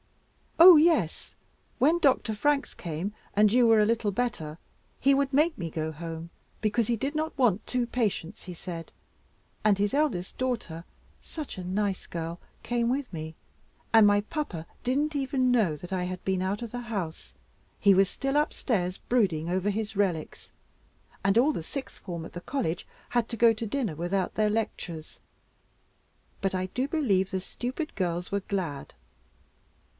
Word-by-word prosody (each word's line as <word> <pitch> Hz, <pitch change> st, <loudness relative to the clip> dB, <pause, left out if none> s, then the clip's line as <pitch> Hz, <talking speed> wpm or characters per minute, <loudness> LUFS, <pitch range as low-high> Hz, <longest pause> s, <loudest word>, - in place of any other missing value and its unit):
"Oh 340 Hz, 0 st, +11 dB
yes; 300 Hz, -, +2 dB, 0.4 s
when 310 Hz, +7 st, +4 dB
Dr. 265 Hz, -7 st, +3 dB
Franks 290 Hz, +6 st, +1 dB
came, 170 Hz, +5 st, -4 dB, 0.2 s
and 210 Hz, 0 st, +5 dB
you 245 Hz, -1 st, +5 dB
were 225 Hz, -1 st, +6 dB
a 210 Hz, -, +5 dB
little 225 Hz, -1 st, +1 dB
better, 190 Hz, -8 st, -2 dB, 0.4 s
he 275 Hz, +2 st, +4 dB
would 275 Hz, 0 st, +1 dB
make 305 Hz, +4 st, +3 dB
me 170 Hz, -2 st, -3 dB
go 160 Hz, 0 st, -3 dB
home, 165 Hz, +1 st, -7 dB, 0.3 s
because 215 Hz, +1 st, +1 dB
he 235 Hz, -, +2 dB
did 275 Hz, +6 st, -2 dB
not 310 Hz, 0 st, -2 dB
want 225 Hz, -7 st, +2 dB
two 250 Hz, -1 st, 0 dB
patients, 215 Hz, -6 st, -2 dB
he 180 Hz, -, -6 dB
said; 165 Hz, -1 st, -7 dB, 0.7 s
and 210 Hz, -2 st, +4 dB
his 205 Hz, +3 st, 0 dB
eldest 275 Hz, -12 st, 0 dB
daughter, 230 Hz, -11 st, -2 dB, 0.4 s
such 305 Hz, -9 st, -7 dB
a 185 Hz, -, -5 dB
nice 195 Hz, +1 st, -1 dB
girl, 165 Hz, +1 st, -5 dB, 0.2 s
came 235 Hz, 0 st, 0 dB
with 265 Hz, +1 st, -1 dB
me; 160 Hz, 0 st, -6 dB, 0.6 s
and 220 Hz, -2 st, +8 dB
my 205 Hz, 0 st, +4 dB
papa 210 Hz, -, -4 dB, 0.2 s
didn't 290 Hz, +5 st, 0 dB
even 265 Hz, -2 st, +1 dB
know 210 Hz, -11 st, +3 dB
that 180 Hz, +5 st, -8 dB
I 180 Hz, -1 st, 0 dB
had 180 Hz, 0 st, -5 dB
been 190 Hz, -1 st, +1 dB
out 195 Hz, +4 st, -1 dB
of 230 Hz, -, -6 dB
the 245 Hz, -, -4 dB
house. 200 Hz, -9 st, -5 dB, 0.4 s
He 200 Hz, -, +6 dB
was 195 Hz, 0 st, +4 dB
still 275 Hz, 0 st, -2 dB
upstairs, 200 Hz, -11 st, 0 dB
brooding 180 Hz, -10 st, +1 dB
over 185 Hz, +3 st, 0 dB
his 215 Hz, +1 st, -3 dB
relics, 185 Hz, -6 st, -2 dB, 0.7 s
and 195 Hz, +2 st, +3 dB
all 270 Hz, +6 st, +5 dB
the 165 Hz, -, -4 dB
sixth 270 Hz, -, -6 dB
form 170 Hz, -4 st, -6 dB
at -, -, -11 dB
the 175 Hz, -, -6 dB
College 180 Hz, -, -2 dB, 0.2 s
had 240 Hz, -2 st, 0 dB
to 230 Hz, -, -4 dB
go 230 Hz, 0 st, +6 dB
to 225 Hz, +1 st, -4 dB
dinner 220 Hz, -, -2 dB
without 175 Hz, +3 st, -1 dB
their 215 Hz, -1 st, +2 dB
lectures; 190 Hz, -7 st, -4 dB, 1.2 s
but 195 Hz, -1 st, 0 dB
I 185 Hz, 0 st, -1 dB
do 255 Hz, +8 st, -2 dB
believe 210 Hz, -, +1 dB
the 190 Hz, -, -2 dB
stupid 255 Hz, -, -5 dB
girls 175 Hz, -1 st, -2 dB
were 200 Hz, 0 st, 0 dB
glad." 175 Hz, -9 st, -4 dB
210 Hz, 170 wpm, -28 LUFS, 180-250 Hz, 1.2 s, Oh